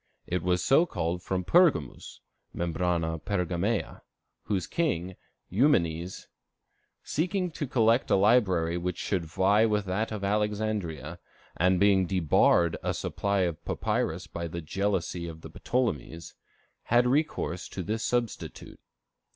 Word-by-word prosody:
It 90 Hz, 0 st, -2 dB
was 90 Hz, +1 st, +1 dB
so 155 Hz, +6 st, +4 dB
called 85 Hz, -, -2 dB
from 95 Hz, 0 st, -2 dB
Pergamus 150 Hz, -, +2 dB, 0.3 s
(membrana 85 Hz, -2 st, -1 dB
pergamea), 95 Hz, +2 st, -1 dB, 0.4 s
whose 95 Hz, -4 st, -1 dB
king, 95 Hz, -, -1 dB, 0.3 s
Eumenes, 90 Hz, -, +1 dB, 0.8 s
seeking 180 Hz, +3 st, -1 dB
to 150 Hz, -2 st, -4 dB
collect 115 Hz, 0 st, +2 dB
a -, -, +4 dB
library 95 Hz, -5 st, +3 dB
which 90 Hz, 0 st, -3 dB
should 90 Hz, -4 st, -2 dB
vie 100 Hz, +7 st, +3 dB
with 105 Hz, -2 st, 0 dB
that 100 Hz, +5 st, -2 dB
of 105 Hz, -2 st, -5 dB
Alexandria, 100 Hz, -7 st, -2 dB, 0.4 s
and 90 Hz, +1 st, +2 dB
being 100 Hz, -2 st, +4 dB
debarred 85 Hz, -1 st, +3 dB
a -, -, -2 dB
supply 100 Hz, -1 st, -1 dB
of 85 Hz, -4 st, -2 dB
papyrus -, -, -2 dB
by 85 Hz, 0 st, -5 dB
the 85 Hz, +1 st, -5 dB
jealousy 90 Hz, 0 st, -2 dB
of 80 Hz, -1 st, -9 dB
the -, -, -9 dB
Ptolemies, 85 Hz, -, -2 dB, 0.5 s
had 120 Hz, +1 st, +3 dB
recourse 125 Hz, -, -1 dB
to 95 Hz, -, -5 dB
this 110 Hz, +4 st, -2 dB
substitute. 120 Hz, -2 st, -3 dB
95 Hz, 125 wpm, -28 LUFS, 85-110 Hz, 0.8 s, so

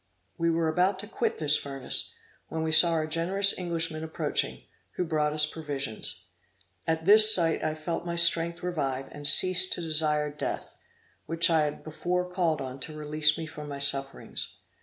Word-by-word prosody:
We 170 Hz, 0 st, -1 dB
were 165 Hz, 0 st, 0 dB
about 180 Hz, +4 st, 0 dB
to 210 Hz, -, -10 dB
quit 235 Hz, -, -3 dB
this 150 Hz, -1 st, +3 dB
furnace, 135 Hz, -2 st, -3 dB, 0.3 s
when 160 Hz, 0 st, -4 dB
we 160 Hz, -, -2 dB
saw 170 Hz, +1 st, +6 dB
our 160 Hz, -1 st, -1 dB
generous 180 Hz, +5 st, +3 dB
Englishman 165 Hz, -3 st, -3 dB
approaching, 160 Hz, 0 st, -2 dB, 0.3 s
who 180 Hz, -, -2 dB
brought 155 Hz, -2 st, -1 dB
us 150 Hz, 0 st, +2 dB
provisions. 145 Hz, -7 st, -1 dB, 0.6 s
At 160 Hz, 0 st, -2 dB
this 215 Hz, +2 st, +8 dB
sight 165 Hz, -6 st, +2 dB
I 155 Hz, -, -2 dB
felt 165 Hz, +2 st, -5 dB
my 170 Hz, -1 st, -5 dB
strength 170 Hz, 0 st, +1 dB
revive, 135 Hz, -7 st, -3 dB
and 145 Hz, 0 st, -1 dB
ceased 185 Hz, +5 st, +4 dB
to -, -, -5 dB
desire 150 Hz, -2 st, 0 dB
death, 150 Hz, -, -6 dB, 0.5 s
which 165 Hz, +1 st, +2 dB
I 160 Hz, -2 st, +2 dB
had 150 Hz, -, -6 dB
before 180 Hz, +3 st, -3 dB
called 175 Hz, -4 st, -1 dB
on 130 Hz, 0 st, -7 dB
to 155 Hz, +3 st, -5 dB
release 150 Hz, 0 st, +1 dB
me 165 Hz, -, -5 dB
from 150 Hz, -1 st, -10 dB
my 140 Hz, -, -6 dB
sufferings. 135 Hz, -1 st, -3 dB
160 Hz, 175 wpm, -27 LUFS, 150-170 Hz, 0.6 s, this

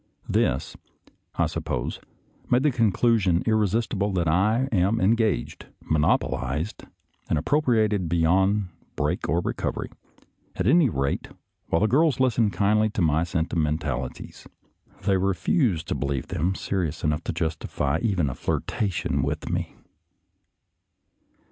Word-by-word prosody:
This, -, -, 0 dB, 0.6 s
I -, -, +2 dB
suppose, -, -, -3 dB, 0.5 s
made 125 Hz, +2 st, +3 dB
the 150 Hz, -, +3 dB
conclusion 110 Hz, -5 st, +2 dB
irresistible 105 Hz, -1 st, +1 dB
that 85 Hz, -3 st, 0 dB
I 105 Hz, +10 st, +2 dB
am 100 Hz, +2 st, +2 dB
engaged, 110 Hz, +3 st, 0 dB
monopolized, 75 Hz, +2 st, -1 dB, 0.4 s
and -, -, +2 dB
appropriated 110 Hz, -, +1 dB
beyond 95 Hz, +4 st, +2 dB, 0.3 s
break -, -, -1 dB
or 85 Hz, +4 st, +2 dB
recovery; -, -, -3 dB, 0.6 s
at 90 Hz, -, -2 dB
any 145 Hz, -, +5 dB
rate, 70 Hz, -6 st, -2 dB, 0.4 s
while 80 Hz, -, +1 dB
the 110 Hz, -, +4 dB
girls 145 Hz, +5 st, +3 dB
listen 120 Hz, -4 st, +3 dB
kindly 105 Hz, +2 st, +2 dB
to 105 Hz, -, -3 dB
my 80 Hz, 0 st, +2 dB
senti 85 Hz, -1 st, -2 dB
mentalities, 75 Hz, -5 st, -3 dB, 0.6 s
they 95 Hz, 0 st, +2 dB
refuse 95 Hz, -, +1 dB
to -, -, -3 dB
believe 70 Hz, +1 st, -3 dB
them 90 Hz, +1 st, -1 dB
serious 90 Hz, -5 st, -3 dB
enough 75 Hz, +1 st, 0 dB
to -, -, -1 dB
justify 80 Hz, -3 st, -2 dB
even 95 Hz, -9 st, +1 dB
a 65 Hz, -, -2 dB
flirtation 80 Hz, -, -1 dB
with 70 Hz, +3 st, -3 dB
me. -, -, -3 dB
95 Hz, 125 wpm, -25 LUFS, 80-110 Hz, 0.6 s, any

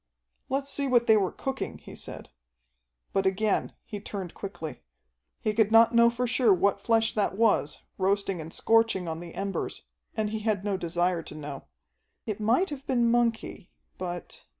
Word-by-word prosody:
"Let's 275 Hz, +1 st, -1 dB
see 280 Hz, -1 st, -1 dB
what 240 Hz, -2 st, +4 dB
they 220 Hz, -, +6 dB
were 195 Hz, -4 st, +2 dB
cooking," 270 Hz, 0 st, -4 dB
he -, -, -12 dB
said. -, -, -8 dB, 0.8 s
But 195 Hz, 0 st, +2 dB
again 200 Hz, +2 st, 0 dB
he 205 Hz, -, -6 dB
turned 195 Hz, -3 st, -6 dB
quickly. 175 Hz, -6 st, -7 dB, 0.6 s
He 215 Hz, -, -1 dB
could 220 Hz, -1 st, +3 dB
not 225 Hz, +1 st, +7 dB
know 235 Hz, 0 st, +6 dB
for 240 Hz, +1 st, -1 dB
sure 240 Hz, -1 st, +3 dB
what 195 Hz, +2 st, +2 dB
flesh 225 Hz, +1 st, +2 dB
that 205 Hz, -2 st, 0 dB
was, 215 Hz, -9 st, +2 dB, 0.2 s
roasting 195 Hz, -2 st, +1 dB
and 160 Hz, +1 st, -8 dB
scorching 225 Hz, -5 st, +2 dB
on 160 Hz, 0 st, -3 dB
the 170 Hz, -1 st, -9 dB
embers, 195 Hz, 0 st, -3 dB, 0.3 s
and 215 Hz, -1 st, 0 dB
he 220 Hz, -, -2 dB
had 210 Hz, -2 st, -1 dB
no 205 Hz, -2 st, 0 dB
desire 175 Hz, 0 st, 0 dB
to 155 Hz, -, -10 dB
know. 145 Hz, -2 st, -7 dB, 0.6 s
It 215 Hz, -2 st, -3 dB
might 240 Hz, -, +2 dB
have 275 Hz, -2 st, -7 dB
been 240 Hz, -2 st, +3 dB
monkey, 230 Hz, -5 st, 0 dB, 0.3 s
but 175 Hz, -1 st, -6 dB
210 Hz, 175 wpm, -28 LUFS, 185-230 Hz, 0.8 s, not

